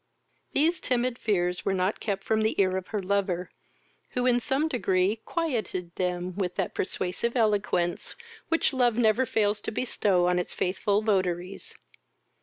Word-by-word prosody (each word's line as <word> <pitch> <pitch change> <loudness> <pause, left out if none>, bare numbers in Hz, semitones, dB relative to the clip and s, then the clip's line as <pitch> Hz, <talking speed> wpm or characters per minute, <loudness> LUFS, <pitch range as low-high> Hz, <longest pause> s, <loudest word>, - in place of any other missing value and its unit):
These 325 +5 +2
timid 250 -1 0
fears 180 -4 0
were 195 - 0
not 185 +2 0
kept 195 -2 -2
from 220 +1 +1
the 220 -1 0
ear 185 -1 +3
of 190 -1 -3
her 210 -3 -3
lover, 185 -2 -1 0.6
who, 250 0 0
in 245 -1 +4
some 275 +5 +1
degree, 195 -7 +1
quieted 220 - -2
them 180 0 -2
with 185 -3 -2
that - - -2
persuasive 185 +7 -2
eloquence 205 -6 +1 0.3
which 330 -3 +2
love 245 -3 +2
never 240 +2 +3
fails 210 -1 +1
to - - -3
bestow 205 -6 +1
on 180 0 +2
its 180 - -3
faithful 200 +3 0
votaries. 185 -3 -1
205 Hz, 155 wpm, -27 LUFS, 185-235 Hz, 0.6 s, in